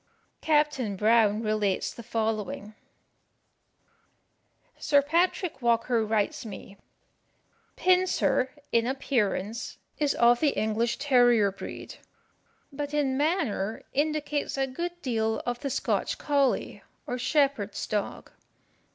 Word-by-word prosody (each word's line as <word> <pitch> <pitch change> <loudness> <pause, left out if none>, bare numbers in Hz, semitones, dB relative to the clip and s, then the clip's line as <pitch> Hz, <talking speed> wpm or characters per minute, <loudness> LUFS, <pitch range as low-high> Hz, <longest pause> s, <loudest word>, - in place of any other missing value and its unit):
Captain 295 -9 +1
Brown 215 +1 +3
relates 215 -3 0
the - - -9
following: 220 -2 -3 2.1
Sir 290 -2 +4
Patrick 340 0 0
Walker 235 0 +2
writes 215 +2 -1
me: 200 -2 -9 1.0
"Pincer, 365 -7 +2 0.2
in 230 0 +2
appearance, 235 -5 -1 0.2
is 295 -2 +1
of 240 0 +5
the 300 -3 +1
English 220 +2 0
terrier 245 -7 +4
breed, 195 - -8 0.8
but 290 +1 -4
in 275 -3 +1
manner 280 - -1
indicates 295 0 -1
a 270 - +2
good 345 +7 -5
deal 225 -4 0
of 245 0 -2
the 280 - -3
Scotch 275 - -1
colley, 280 -3 0 0.2
or 250 - -4
shepherd's 270 -6 0
dog. 210 -1 -3
245 Hz, 105 wpm, -27 LUFS, 220-290 Hz, 2.1 s, of